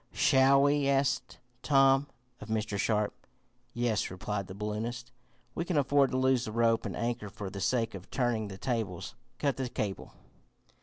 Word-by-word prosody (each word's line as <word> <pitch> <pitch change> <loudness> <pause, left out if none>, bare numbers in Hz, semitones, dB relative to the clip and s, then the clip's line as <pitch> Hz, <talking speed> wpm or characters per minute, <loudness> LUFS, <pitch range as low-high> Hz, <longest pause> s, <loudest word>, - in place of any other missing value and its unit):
"Shall 135 +1 +5
we?" 145 -1 +3
asked 140 0 0 0.2
Tom 135 -1 +4 0.3
of 105 - -9
Mr. 110 -2 -2
Sharp. 105 0 +1 0.6
"Yes," 120 -3 0
replied 100 +1 -4
the 95 - -8
balloonist. 115 +4 -4 0.4
"We - - -2
can 170 -2 -1
afford 140 -1 +3
to 130 - -1
lose 130 -1 +3
the 110 - -5
rope 115 0 +2
and - - -5
anchor 115 -3 -2
for 100 -2 -7
the 100 - -6
sake 115 0 0
of 95 -2 -9
turning 120 -4 0
the 95 -1 -8
tables. 110 -7 -3 0.2
Cut 140 -2 0
the 130 -2 -2
cable." 100 -5 -4
120 Hz, 165 wpm, -30 LUFS, 105-135 Hz, 0.6 s, Shall